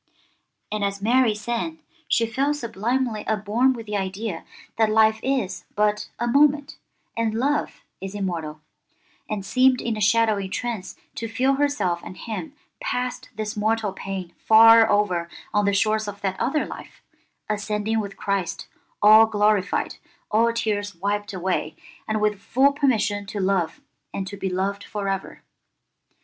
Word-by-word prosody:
And 210 -1 -2
as 200 0 -1
Mary 235 +1 +3
sang 240 +9 -3 0.3
she 230 - +2
felt 275 +6 0
sublimely 235 -1 -2
upborn 220 +5 +2
with 230 -3 -8
the 210 -1 -2
idea 195 -1 -4 0.3
that 220 -1 +3
life 220 0 +4
is 250 -8 -1
but 210 0 +1
a 240 - -1
moment 285 +3 +2 0.4
and 225 -1 0
love 285 +5 -1 0.2
is 195 +1 -6
immortal, 165 -6 -4 0.7
and 205 -2 -3
seemed 255 +2 +4
in 230 -2 -2
a 215 - -5
shadowy 215 -2 +2
trance 225 -2 -4 0.2
to 230 - -4
feel 255 +5 +1
herself 275 -12 0
and 185 - -9
him 255 +7 -6 0.3
past 250 - -3
this 215 0 -4
mortal 215 -1 0
pain 190 -3 -6
far 225 +1 +7
over 185 -5 +1 0.2
on 205 0 +2
the 200 - +3
shores 215 +1 +1
of 200 0 -7
that 190 -2 -2
other 275 +6 0
life, - - -11 0.4
ascending 215 +1 -1
with 200 -2 -5
Christ 195 -4 -2 0.4
all 215 +1 +8
glorified, 210 -2 +1 0.3
all 230 +2 +4
tears 210 -4 -2
wiped 205 +3 -2
away, 180 -4 -2 0.3
and 215 0 0
with 210 -1 +1
full 270 +4 +3
permission 220 -8 +1
to 205 0 -5
love 190 -3 0 0.3
and 195 - -2
to 200 +2 -7
be 195 -1 -3
loved 195 +2 -2
for 205 -2 -4
ever. 195 -1 -4
215 Hz, 150 wpm, -24 LUFS, 200-230 Hz, 0.7 s, all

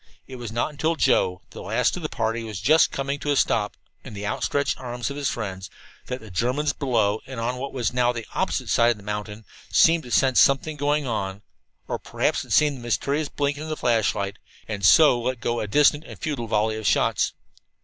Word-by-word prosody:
It 130 - -9
was 120 -3 -6
not 120 +6 -1
until 160 +3 -1
Joe, 90 - +2
the - - -9
last - - 0
of - - -6
the - - -3
party, 115 +1 -2
was 110 -3 -6
just 155 +2 +4
coming 140 +1 -3
to 145 - -4
a - - +2
stop 105 -6 +1 0.3
in - - -9
the 100 +1 -5
outstretched 140 +7 -1
arms 125 +1 -4
of - - -6
his 140 -2 -1
friends, 95 -4 -5 0.4
that 125 0 -4
the 110 -4 -12
Germans 130 +9 0
below, 110 -7 0
and 130 -3 -6
on 120 +2 -2
what 140 +2 -5
was 120 -4 -2
now 125 -1 +2
the 115 -2 -6
opposite 120 -1 +1
mountain, 105 +1 -5 0.3
seemed 165 0 +5
to 125 - -11
sense 130 +1 +3
something 150 +3 +3
going 145 0 0
on 100 -4 -3 0.4
or - - -3
perhaps - - -1
had - - -11
seen 150 -1 +4
the 135 - -9
mysterious 140 +5 -1
blinking 145 0 -2
of 155 - -6
the 155 - -3
flashlight 105 -4 0 0.3
and 105 -2 -4 0.4
let 130 0 -2
go 120 +1 -1
a 105 - -3
distant 145 +6 +3
and - - -10
futile 140 -8 -3
volley 110 0 +1
of 110 - -3
shots. - - +2
120 Hz, 205 wpm, -24 LUFS, 110-140 Hz, 0.4 s, seemed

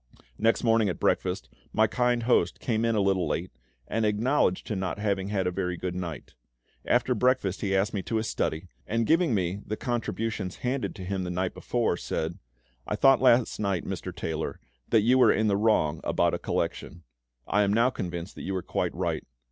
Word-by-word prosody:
Next 115 +1 +2
morning 115 -3 +3
at 90 - -4
breakfast, - - 0 0.2
my 110 - +4
kind 120 +1 +1
host 115 -7 +2
came 115 -1 0
in 115 -1 +1
a 105 - +2
little 95 -3 +1
late, 85 +4 -2 0.4
and 115 - -1
acknowledged 105 -1 +1
to 105 - -3
not 95 -1 -2
having 100 -2 -1
had 100 -2 -1
a 90 - +1
very 90 -1 -2
good 90 0 -3
night. 90 -4 -6 0.5
After 125 +1 +2
breakfast 125 -5 +1
he 95 -1 0
asked 100 +4 +1
me 100 - -1
to 115 - -4
his 110 0 0
study, 80 +3 -2 0.2
and 115 +1 0
giving 165 -4 +3
me 95 +1 -1
the 110 - -4
contributions 115 -5 -2
handed 130 +1 -1
to 95 -3 -7
him 95 0 -2
the 90 - -4
night 90 +1 -1
before, 115 -7 -1
said, 80 0 -3 0.5
"I - - -1
thought 135 -2 +5
last 125 -2 +4
night, 100 -5 -1
Mr. - - -4
Taylor, 80 -1 -4 0.3
that 115 - +5
you 125 +5 +4
were - - +7
in 110 - +1
the 100 -2 +3
wrong 100 -8 +2
about - - +1
a - - -1
collection; - - -3 0.4
I 105 - +2
am 100 -1 +2
now 115 +4 +3
convinced 85 -5 -5
you 95 - -3
were 95 - -2
quite - - -2
right. - - -1
105 Hz, 200 wpm, -27 LUFS, 90-115 Hz, 0.5 s, were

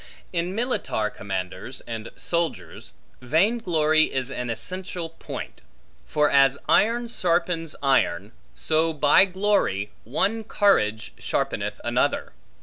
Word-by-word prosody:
In 175 +2 -1
militar 220 - -1
commanders 95 +5 -5
and 115 -1 -6
soldiers, 160 - -3 0.3
vain 170 - +2
glory 155 -5 +3
is 130 0 -3
an 125 -2 -4
essential 175 - -5
point; 165 - -8 0.5
for 150 0 +2
as 135 0 +5
iron 235 +3 +3
sharpens 170 -6 0
iron, 105 -8 +2 0.2
so 160 +1 +1
by 150 +5 +5
glory, 185 - 0
one 200 - 0
courage 110 - +1
sharpeneth - - -2
another. - - 0
155 Hz, 110 wpm, -24 LUFS, 115-185 Hz, 0.5 s, as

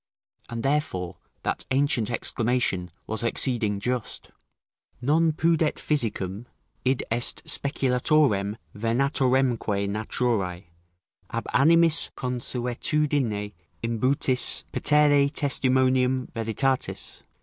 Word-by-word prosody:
And 115 -1 -5
therefore 135 - -1 0.3
that - - -2
ancient 130 -4 +1
exclamation 115 -6 0 0.2
was 110 0 -2
exceeding 115 -3 +1
just: 125 +2 -3 0.7
"Non 155 +6 +2
pudet 160 0 +1
physicum, 115 -6 -1 0.4
id 130 0 +1
est 120 +1 -1
speculatorem 125 -6 +1 0.2
venatoremque 120 -2 +1
naturae, 105 -3 -1 0.7
ab 115 - -4
animis 165 +4 +5
consuetudine 125 -2 0 0.3
imbutis 125 +2 +1
petere 145 -1 +4
testimonium 130 -2 +1
veritatis?" 115 +4 -2
125 Hz, 80 wpm, -25 LUFS, 110-140 Hz, 0.7 s, animis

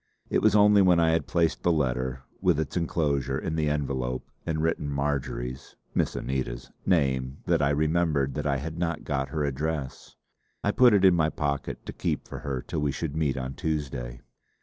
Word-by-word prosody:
It - - +2
was 110 -1 +4
only 105 -1 +6
when 90 -2 +5
I 80 -1 +4
had 80 - 0
placed 85 -2 +1
the 90 - +3
letter 65 -3 -1 0.2
with 90 -5 +3
its 80 - -3
enclosure 75 -6 0
in 80 - -3
the 75 -2 +1
envelope 65 -4 -2 0.2
and 80 -1 0
written 80 -2 0
Marjory's 70 -3 -3 0.2
Miss - - 0
Anita's 65 -2 -3 0.2
name 65 -6 +1
that 85 -3 +2
I 70 - +3
remembered 75 -2 +1
that 75 - -2
I 70 -1 +1
had 80 +4 -5
not 85 -2 -1
got 70 -2 -2
her 80 -1 -1
address. 70 0 -3 0.5
I - - +2
put 125 -4 +6
it 100 -1 +4
in 95 - +7
my 80 -2 +2
pocket 70 -3 -3
to - - -6
keep - - -2
for 70 - -7
her 70 -3 -3
till - - -3
we 75 -1 +1
should 75 +1 -4
meet 75 -4 0
on 65 0 -3
Tuesday. 65 -6 -3
75 Hz, 195 wpm, -27 LUFS, 65-80 Hz, 0.5 s, in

